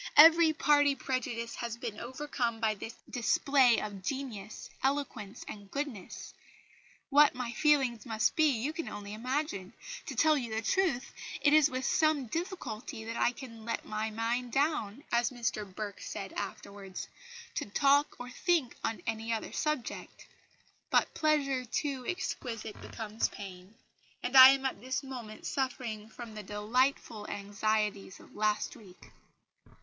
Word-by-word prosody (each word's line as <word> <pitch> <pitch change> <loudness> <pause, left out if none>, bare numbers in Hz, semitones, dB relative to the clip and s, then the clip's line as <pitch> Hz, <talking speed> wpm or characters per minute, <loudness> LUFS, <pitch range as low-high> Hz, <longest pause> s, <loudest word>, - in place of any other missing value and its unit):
Every 325 +1 +9
party 290 -2 +4
prejudice 235 -4 -3
has 235 -1 -4
been 230 -3 -5
overcome 250 -2 -2
by 220 -2 +2
this 225 +3 -8
display 250 0 +4
of 205 -2 -5
genius, 215 -3 -5
eloquence 265 -7 -2
and 205 -2 -9
goodness.... 275 -9 -5 0.8
What 290 -1 +6
my 250 -2 -3
feelings 265 -6 +2
must 220 -2 +1
be, 310 -1 +5
you 265 +3 -1
can 330 0 -4
only 205 0 -7
imagine. 250 -4 -2 0.3
To - - -4
tell 315 -1 +5
you 235 -3 -4
the 225 - -1
truth, 320 - +1 0.3
it 295 - +4
is 305 -1 +6
with 255 -1 -3
some 310 -4 +2
difficulty 250 - -5
that 230 +1 -4
I 240 - +3
can 230 -3 -10
'let 230 +1 -3
down - - -15
my 215 +1 -1
mind,' 235 +3 -1 0.5
as 240 +1 +3
Mr 230 -5 -3
Burke 205 +1 -6
said 195 -1 -6
afterwards, 200 -1 -6 0.5
to - - -3
talk 280 +7 +3
or 245 0 -7
think 320 -3 +1
on 225 -5 -2
any 225 0 -2
other 225 - -2
subject. 305 -5 -3 0.6
But - - +3
pleasure 285 -4 +1
too 260 +1 -2
exquisite 230 - -4
becomes 220 -1 -2
pain; 190 0 -10 0.5
and 250 +2 -2
I 260 0 +13
am 270 0 +2
at 260 -6 -2
this 260 +3 -2
moment 245 -5 -8
suffering 235 -5 -3
from 235 -1 -9
the 215 - -6
delightful 210 +2 0
anxieties 205 -1 -1
of - - -17
last 215 0 0
week." 190 -4 -15
235 Hz, 145 wpm, -31 LUFS, 215-275 Hz, 0.8 s, I